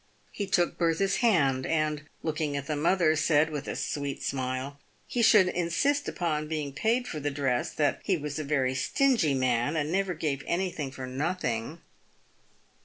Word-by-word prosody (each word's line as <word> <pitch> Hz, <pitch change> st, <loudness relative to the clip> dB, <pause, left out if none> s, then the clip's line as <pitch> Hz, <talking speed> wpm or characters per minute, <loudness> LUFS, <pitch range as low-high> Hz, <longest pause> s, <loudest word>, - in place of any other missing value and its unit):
He 200 Hz, -, -4 dB
took 175 Hz, -2 st, +1 dB
Bertha's 175 Hz, +3 st, +2 dB
hand, 140 Hz, -, +3 dB
and, 155 Hz, -2 st, 0 dB, 0.2 s
looking 155 Hz, -2 st, -1 dB
at 140 Hz, -, -4 dB
the 150 Hz, -, -2 dB
mother, 160 Hz, +1 st, +3 dB
said, 155 Hz, 0 st, +3 dB
with 145 Hz, -2 st, -5 dB
a -, -, -3 dB
sweet 140 Hz, -1 st, -3 dB
smile, 130 Hz, +1 st, -3 dB, 0.3 s
he 245 Hz, -, -1 dB
should 210 Hz, -4 st, +6 dB
insist 180 Hz, +13 st, 0 dB
upon 155 Hz, -4 st, -2 dB
being 150 Hz, -3 st, -3 dB
paid 230 Hz, -, 0 dB
for 155 Hz, -, -4 dB
the 145 Hz, 0 st, -1 dB
dress 135 Hz, -3 st, 0 dB
— -, -, -16 dB
that 145 Hz, -2 st, +1 dB
he 190 Hz, -3 st, +1 dB
was 150 Hz, 0 st, -4 dB
a -, -, -2 dB
very 135 Hz, -3 st, +1 dB
stingy 195 Hz, -, +2 dB
man, 130 Hz, +3 st, +1 dB
and 155 Hz, 0 st, -1 dB
never 190 Hz, -1 st, 0 dB
gave 145 Hz, -3 st, -2 dB
anything 170 Hz, -5 st, -1 dB
for 130 Hz, -1 st, -7 dB
nothing. 135 Hz, 0 st, -3 dB
155 Hz, 175 wpm, -28 LUFS, 140-175 Hz, 0.3 s, should